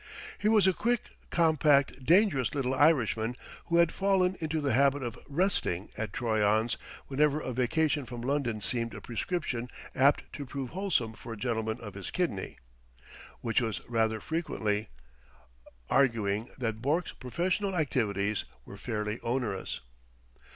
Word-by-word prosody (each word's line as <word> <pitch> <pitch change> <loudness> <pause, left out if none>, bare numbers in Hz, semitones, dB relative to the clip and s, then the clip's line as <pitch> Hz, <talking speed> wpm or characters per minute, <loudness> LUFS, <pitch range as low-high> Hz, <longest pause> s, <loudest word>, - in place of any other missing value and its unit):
He 210 - +2
was 215 -3 +5
a 190 - +5
quick, 235 +4 -1 0.2
compact, 150 -5 +3
dangerous 165 - +4
little 130 -2 0
Irishman 125 -5 +3 0.3
who 170 - +1
had 170 -1 +5
fallen 190 -1 +2
into 160 -1 -1
the 140 -4 0
habit 140 +2 +3
of 120 -2 -5
"resting" 145 - 0
at 110 - -3
Troyon's 110 0 +2 0.3
whenever 145 +2 +2
a 130 - -4
vacation 145 +3 +1
from 120 -2 -6
London 125 -5 0
seemed 115 +1 -1
a - - -6
prescription 125 -2 -3 0.2
apt 140 +2 +4
to 145 - -5
prove 135 -1 -5
wholesome 180 - 0
for 115 +1 -8
a - - -8
gentleman 110 0 -1
of 105 -3 -8
his 100 0 -5
kidney; 165 - -2 0.8
which 115 +2 +1
was 115 -3 -3
rather 110 -2 +1
frequently, 110 -9 -1 1.0
arguing 115 -4 +2
that 110 -3 -2
Bourke's 155 +7 0
professional 185 - -1
activities 105 - 0 0.2
were 100 - -10
fairly 105 0 -3
onerous. 115 - -2
130 Hz, 140 wpm, -30 LUFS, 110-160 Hz, 1.0 s, was